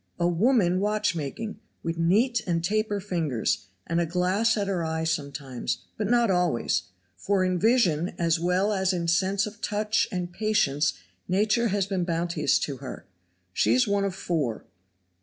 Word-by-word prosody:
A 170 - +2
woman 185 0 +3
watchmaking, 210 -1 -2 0.2
with 165 0 -3
neat 220 +8 +3
and 165 -2 0
taper 210 +2 0
fingers, 160 - -1 0.2
and 170 +1 0
a - - +1
glass 185 +7 +1
at 205 - 0
her 185 -4 -1
eye 160 0 -2
sometimes, 140 -5 -3
but 210 - -2
not 240 -3 +3
always, 170 - +1 0.3
for 190 - 0
in 185 -1 0
vision 190 -7 +2
as 165 -1 +1
well 180 +4 +1
as 190 -1 +1
in 170 -2 -2
sense 190 +4 +2
of 215 +1 -9
touch 210 +1 0
and 180 -2 -3
patience 175 - +1 0.3
nature 210 +5 +2
has 200 -2 0
been 190 -2 -1
bounteous 170 -2 +1
to 140 -3 -3
her. 130 -1 -8 0.5
She - - +3
is 250 -2 +3
one 200 0 +1
of 195 -2 -2
four. 150 - -2
185 Hz, 160 wpm, -26 LUFS, 165-210 Hz, 0.5 s, woman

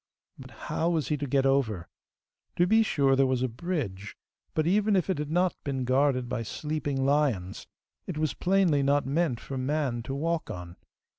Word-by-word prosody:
But - - -10
how 165 - -2
was 160 -5 0
he 150 - +1
to 145 0 -4
get 135 +1 +2
over? 115 -10 +1 0.7
To 175 - +3
be 220 +4 +4
sure 140 -10 +2
there 135 0 +3
was 130 -1 0
a - - +2
bridge, 120 - -4 0.4
but, 155 - +1
even 205 +4 +3
if 190 0 +1
it 180 - -2
had 150 -1 -3
not 175 +2 +1
been 135 -2 -2
guarded 130 0 +2
by 120 -1 -2
sleeping 145 +2 -2
lions, 135 -11 0 0.4
it 175 - -4
was 155 -1 0
plainly 180 -6 +2
not 140 +1 +2
meant 140 -3 0
for 135 +1 -6
man 130 -3 -1
to 135 +4 -5
walk 165 +1 -1
on. 90 -4 -7
140 Hz, 190 wpm, -28 LUFS, 130-160 Hz, 0.7 s, be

